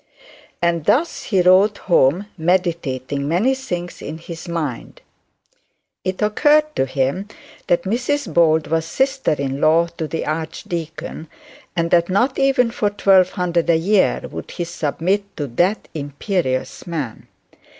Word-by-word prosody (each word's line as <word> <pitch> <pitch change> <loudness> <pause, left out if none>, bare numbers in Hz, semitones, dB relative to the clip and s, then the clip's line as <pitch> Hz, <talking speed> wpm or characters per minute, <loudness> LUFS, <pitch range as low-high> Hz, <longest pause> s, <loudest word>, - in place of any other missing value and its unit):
And 170 -2 +1
thus 275 -1 +1
he 190 -4 +2
rode 190 +3 +5
home, 175 +1 +2
meditating 160 -6 -1
the 140 - -3
many 190 - +2
things 180 -10 -5
in 155 +2 -6
his 165 +1 -9
mind. 155 -8 -4 1.0
It 185 +2 -2
occurred 300 +8 +3
to 135 - +1
him 135 +9 -1 0.4
that 175 0 +2
Mrs 250 +8 -1
Bold 160 -2 +4
was 160 +1 0
sister 265 - 0
in 140 -1 -3
law 165 +2 +4
to 160 - -2
the 165 - -3
archdeacon; 160 +1 -5 0.5
and 170 -1 0
that 170 0 +4
not 240 +8 +1
even 270 -3 +3
for 210 -3 0
twelve 195 -2 +4
hundred 175 -3 0
a 165 - +5
year 190 +4 +2
would - - -7
he 175 - -4
submit 175 +5 -2
to 145 - -2
that 175 - 0
imperious 145 0 -3
man. 150 -10 -5
175 Hz, 140 wpm, -20 LUFS, 160-200 Hz, 1.0 s, rode